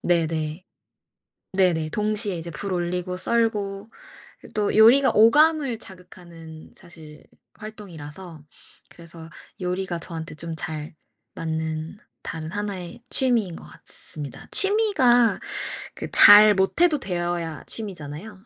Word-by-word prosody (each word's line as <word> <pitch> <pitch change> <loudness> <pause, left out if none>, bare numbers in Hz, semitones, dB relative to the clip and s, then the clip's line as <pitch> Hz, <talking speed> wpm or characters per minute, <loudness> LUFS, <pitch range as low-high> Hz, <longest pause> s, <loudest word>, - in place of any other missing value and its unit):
네네. 160 -1 -1 0.9
네네. 175 -5 +2
동시에 210 0 -1
이제 170 +1 -6
불 190 +5 -4
올리고 180 +1 -3
썰고 210 -1 -1
그 - - -24 0.6
또 210 -1 0
요리가 240 +6 +6
오감을 280 +3 +4
자극하는 170 -5 -13
사실 155 -3 -15 0.3
활동이라서 180 -6 -10 0.5
그래서 165 -1 -13 0.3
요리가 180 -1 -3
저한테 165 -2 -7
좀 165 +1 -6
잘 155 -2 -6 0.4
맞는 160 +2 -4 0.2
다른 160 0 -6
하나의 200 -1 -5
취미인 235 -10 +1
것 - - -11
같습니다. 145 -4 -8
취미가 390 - +3 0.6
그 - - -6
잘 210 0 +9
못해도 300 - +2
되어야 175 - -3
취미잖아요. 190 0 -6
180 Hz, 245 characters per minute, -23 LUFS, 160-215 Hz, 0.9 s, 잘